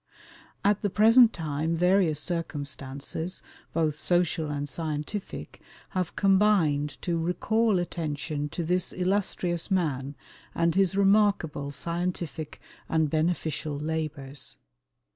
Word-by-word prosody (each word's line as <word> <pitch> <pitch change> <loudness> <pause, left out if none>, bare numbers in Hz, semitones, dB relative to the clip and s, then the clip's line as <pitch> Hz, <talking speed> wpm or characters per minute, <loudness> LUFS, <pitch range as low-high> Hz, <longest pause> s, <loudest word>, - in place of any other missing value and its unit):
At 205 0 +3
the 205 - +1
present 225 +4 +7
time 160 -1 -2
various 180 -3 +3
circumstances, 145 +1 -4 0.3
both 160 -3 +1
social 175 -3 +1
and 145 0 -3
scientific, 155 +6 -5 0.3
have 185 -3 -2
combined 190 -8 +3
to 170 -2 0
recall 205 +5 +1
attention 150 -4 -3
to 170 - -3
this 180 +2 0
illustrious 180 -2 0
man 145 -7 0 0.4
and 170 0 +2
his 195 +1 +2
remarkable 200 -8 +3
scientific 170 0 -4 0.3
and 160 -2 +2
beneficial 155 -2 -1
labours. 150 -3 -4
165 Hz, 105 wpm, -27 LUFS, 150-185 Hz, 0.4 s, present